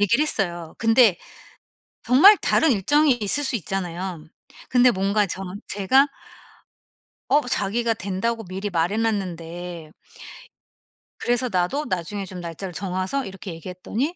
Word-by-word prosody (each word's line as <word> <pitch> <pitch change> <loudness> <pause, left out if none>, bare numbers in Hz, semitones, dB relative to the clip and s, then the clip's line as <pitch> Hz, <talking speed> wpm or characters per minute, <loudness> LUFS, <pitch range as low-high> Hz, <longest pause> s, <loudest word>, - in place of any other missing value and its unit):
얘기를 220 +8 +3
했어요. 175 - -1
근데 225 -4 +5 0.9
정말 350 +12 +7
다른 320 -3 +3
일정이 290 +8 +3
있을 240 +6 0
수 265 - -1
있잖아요. 180 -3 -4 0.5
근데 250 0 +5
뭔가 200 0 +1
저 190 +1 -5 0.3
제가 205 +8 +3 1.2
어 290 - +4
자기가 230 +1 0
된다고 220 +3 -3
미리 190 +3 -5
말해놨는데 175 -3 -2 1.3
그래서 245 +1 0
나도 185 +11 0
나중에 190 - -3
좀 185 -1 -8
날짜를 175 +2 -7
정해서 190 +9 -2
이렇게 195 -1 -8
얘기했더니 185 - -4
195 Hz, 280 characters per minute, -23 LUFS, 180-240 Hz, 1.3 s, 정말